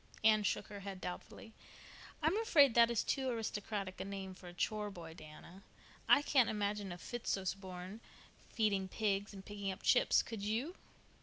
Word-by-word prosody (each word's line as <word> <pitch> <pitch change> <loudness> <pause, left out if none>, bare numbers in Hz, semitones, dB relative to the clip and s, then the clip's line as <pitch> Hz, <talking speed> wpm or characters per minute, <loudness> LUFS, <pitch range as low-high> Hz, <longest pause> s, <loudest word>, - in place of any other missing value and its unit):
Anne 215 -1 +6
shook 205 - 0
her 205 - -8
head 195 -1 -6
doubtfully. 185 +5 -7 0.7
"I'm 320 +5 +3
afraid 290 - +6
that 235 0 +6
is 235 -2 +1
too 265 -1 0
aristocratic 205 -4 -3
a - - -1
name 195 -1 -5
for 185 -1 -13
a 175 - -9
chore 210 +3 -1
boy, 170 -4 -9
Diana. 165 +3 -12 0.5
I 285 - +7
couldn't 265 -5 +4
imagine 205 -2 -1
a 175 - -6
Fitzosborne 190 -2 -4 0.5
feeding 200 -4 +1
pigs 200 0 -1
and 195 -1 -10
picking 200 -1 -3
up 190 - -9
chips, - - +5
could 225 -3 -6
you?" 225 - -1
205 Hz, 165 wpm, -36 LUFS, 190-225 Hz, 0.7 s, I